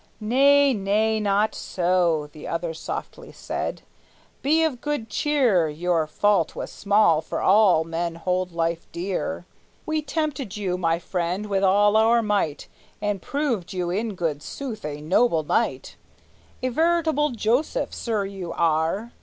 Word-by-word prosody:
"Nay, 275 +5 +4
nay, 215 +1 +1
not 210 +1 +1
so," 175 -4 0
The 150 - -10
other 165 0 -3
softly 160 - -7
said. - - -5 0.6
"Be 315 +4 +3
of 280 -7 -1
good 290 -8 -3
cheer; 240 - +2
Your 165 +1 0
fault 195 +1 +1
was - - -5
small, 200 -6 +3
for - - -4
all 190 -5 +5
men 165 +1 -3
hold 180 +2 -1
life 165 0 -2
dear. 190 +10 -3 0.4
We 310 0 -1
tempted 295 - -3
you, 190 -3 -1
my 165 -2 +1
friend, 180 +3 -3
with 200 -2 -1
all 205 +2 +4
our 225 +2 +4
might, 200 -8 -1 0.3
And 205 -2 -2
proved 250 - -2
you 180 -2 -2
in 210 +2 -2
good 160 -5 -2
sooth 235 - -6
a 150 0 -5
noble 165 +1 +2
knight; - - -1 0.7
A 255 - +1
veritable 315 +1 +2
Joseph, 245 - 0
sir, 215 -4 -2
you 190 -3 -6
are!" 165 +7 0
200 Hz, 145 wpm, -24 LUFS, 170-235 Hz, 0.7 s, all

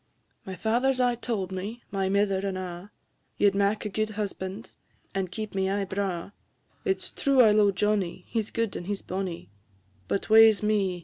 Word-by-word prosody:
"My 190 - -5
father 235 +6 +1
's 260 - -3
aye 245 -1 +3
tauld 225 -6 -3
me, 200 +6 -5
my 195 -1 0
mither 200 -1 +2
and 195 -1 -2
a', 180 +1 -6 0.5
Ye 205 - +4
'd 200 - +3
mak 200 +2 +1
a - - -1
gude 215 +2 -1
husband, 200 +1 -4 0.4
and 190 -2 -2
keep 215 +3 -5
me 190 -1 0
aye 200 0 0
braw; 190 -2 -3 0.5
It 390 -3 +1
's - - -5
true 275 -3 +3
I 220 -3 +7
lo'e 210 -1 +4
Johnnie, 200 -2 -1
he 225 - 0
's 215 - -9
gude 230 -3 -2
and 175 - -6
he 205 - 0
's - - -14
bonnie; 180 - -5 0.6
But, 195 - -1
waes 220 -1 +7
me! 200 -4 +1
200 Hz, 200 wpm, -27 LUFS, 190-220 Hz, 0.6 s, I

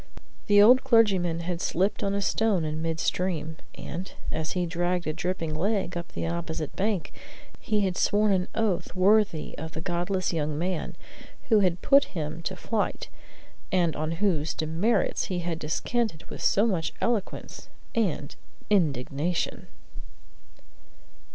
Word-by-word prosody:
The 205 0 +6
old 245 +5 +7
clergyman 195 -9 +3
had 170 0 -3
slipped 190 +5 0
on 200 -1 0
a 200 - 0
stone 205 -7 +1
in 155 +1 -3
mid 165 0 -2
stream, 160 -4 -1 0.2
and, 180 +5 -6 0.2
as 160 0 -2
he 180 -1 0
dragged 175 +1 -1
a 155 - -1
dripping 165 -2 -2
leg 190 +2 0
up 170 -1 -6
the - - -3
opposite 165 -2 -3
bank, 195 -1 -1 0.5
he 210 -1 0
had 190 -2 0
sworn 210 +2 +3
an 185 -1 +1
oath 200 -7 -1
worthy 195 -3 +3
of 160 +1 -6
the - - -5
"godless 175 +2 -1
young 150 -2 -1
man" 180 +1 -2 0.5
who 220 -3 +6
had 180 -3 +1
put 280 0 +6
him 155 +1 -3
to 185 +3 -4
flight, 210 +3 -2 0.6
and 175 -4 +2
on 155 +1 -2
whose 165 -4 0
demerits 165 +9 +1
he 185 -4 -3
had 170 -2 -3
descanted 175 +3 -1
with - - -7
so 205 - +3
much 180 -8 -1
eloquence 230 -5 -2 0.2
and 215 -8 -1 0.4
indignation. 155 -2 0
180 Hz, 145 wpm, -27 LUFS, 160-200 Hz, 0.6 s, old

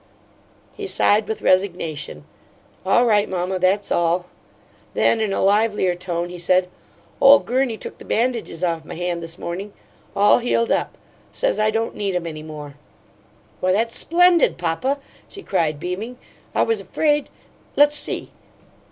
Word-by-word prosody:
He 410 -2 -6
sighed 210 - +2
with 220 - -4
resignation. 165 - 0 0.6
"All 240 +5 +4
right, 210 -3 +3
mamma. 185 0 -2
That's 190 +3 +1
all." 175 +1 +1 0.7
Then, 225 - +3
in 215 -2 0
a - - -1
livelier 205 -2 +2
tone, 175 -1 -3
he 180 0 -8
said: 180 +1 +2 0.5
"Ole 275 +1 +9
Gurney 250 -3 -1
took - - -8
the - - -10
bandages 230 -7 -1
off 165 -2 0
my - - -8
hand 175 0 -2
this 165 0 -6
morning. 195 +4 -6 0.4
All 205 +4 +5
healed 235 -1 0
up. - - -1 0.3
Says - - -1
I 215 0 +3
don't 225 +1 -1
need 200 -3 -2
'em 175 -1 -2
any 155 -2 -6
more." 150 -2 -9 0.9
"Why, 185 0 +1
that's 230 +3 0
splendid, 350 0 +3
papa!" 180 +11 -1 0.3
she 395 - -9
cried, 155 -6 0
beaming. 190 +9 -5 0.4
"I - - +4
was 455 -1 0
afraid 295 -2 0 0.5
Let's 290 +1 +5
see." 295 - -2
195 Hz, 150 wpm, -21 LUFS, 175-230 Hz, 0.9 s, Ole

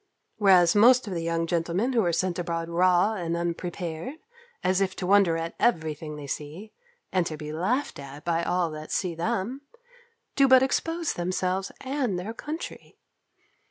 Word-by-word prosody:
Whereas 185 -5 +5
most 245 +4 +6
of 200 - -5
the 170 - -2
young 165 0 -1
gentlemen 175 +9 0
who 230 -3 +3
are 175 - +1
sent 180 +1 -1
abroad 170 -1 -3
raw 180 +4 +3
and 170 -4 -2
unprepared, 170 - -4 0.5
as 185 +1 +2
if 190 -1 0
to 185 - -4
wonder 190 -3 +4
at 165 0 -4
every 160 -10 +2
thing 150 0 -8
they 150 -1 -8
see, 155 +9 -6 0.4
and 185 -2 +2
to 155 - -5
be 150 0 -6
laughed 210 - -1
at 140 +2 -10
by 170 -1 +1
all 175 -1 0
that 155 0 -8
see 180 -3 -1
them, 190 +10 -2 0.7
do 275 -1 +5
but 260 0 +7
expose 330 +4 -1
themselves 185 +2 -2
and 260 -7 -1
their 195 +6 -5
country. 305 +8 -7
180 Hz, 170 wpm, -26 LUFS, 165-215 Hz, 0.7 s, but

